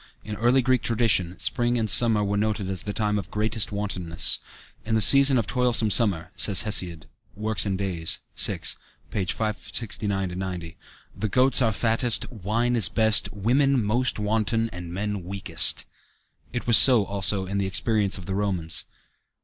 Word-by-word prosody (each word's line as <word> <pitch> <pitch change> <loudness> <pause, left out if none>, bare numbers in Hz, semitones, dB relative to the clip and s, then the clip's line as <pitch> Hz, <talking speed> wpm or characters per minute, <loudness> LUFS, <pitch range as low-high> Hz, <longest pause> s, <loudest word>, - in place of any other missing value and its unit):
In 105 - -7
early 125 +3 +1
Greek 130 -1 0
tradition, 105 -6 0
spring 120 -1 -1
and 110 -2 -2
summer 110 0 +3
were 100 0 -3
noted 105 -1 -2
as 95 -2 +1
the 105 - -6
time 105 -1 -2
of 95 - -9
greatest 110 0 -2
wantonness. 95 -5 -1 0.4
"In 115 - -3
the - - +1
season 135 +3 +6
of 115 - -1
toilsome 120 -2 0
summer," 100 -6 0
says 100 -3 +4
Hesiod 90 -6 0 0.3
(Works 110 0 -1
and 95 -1 -3
Days, 90 -4 -2 0.2
xi, - - +1 0.5
569 100 -1 -3
90), 90 -3 -7 0.4
"the 110 +2 -4
goats 130 +5 +3
are 115 -3 +1
fattest, 115 +3 -1
wine 115 +3 -2
is 110 -7 +3
best, 110 -1 +2
women 125 +5 0
most 120 +5 -1
wanton, 110 +2 -2
and 90 -1 -9
men 100 +1 -5
weakest." 95 +2 +1 0.7
It 120 - -6
was 115 -2 +8
so, 120 -6 +7
also, 100 0 -1
in 100 +2 -4
the 95 - -2
experience 100 +1 -1
of 90 - -11
the 95 - -5
Romans. 95 -5 -2
105 Hz, 160 wpm, -23 LUFS, 95-115 Hz, 0.7 s, was